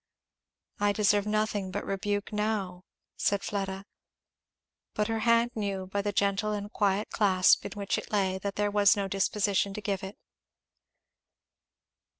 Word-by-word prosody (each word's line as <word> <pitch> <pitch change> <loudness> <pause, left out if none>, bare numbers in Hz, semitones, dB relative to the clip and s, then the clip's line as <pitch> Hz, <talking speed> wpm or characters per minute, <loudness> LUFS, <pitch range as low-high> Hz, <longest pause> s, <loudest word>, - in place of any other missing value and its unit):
"I 205 0 +2
deserve 205 0 +2
nothing 215 -2 0
but - - -4
rebuke 205 +2 -2
now," 205 -4 -2 0.3
said 200 -1 +1
Fleda. 195 -1 -3 1.1
But 210 +1 0
her 225 0 0
hand 230 +1 +3
knew, 200 -3 -3
by 200 +2 -2
the 205 +1 -1
gentle 200 +2 +1
and 205 0 -5
quiet 200 0 0
clasp 190 -3 +4
in - - -9
which 200 -1 -2
it - - -11
lay, 190 -2 +1
that 200 0 -4
there 205 0 0
was 205 0 +4
no 200 -1 -1
disposition 195 0 0
to - - -4
give 195 -2 -2
it. 195 +1 -7
205 Hz, 150 wpm, -29 LUFS, 195-210 Hz, 1.1 s, clasp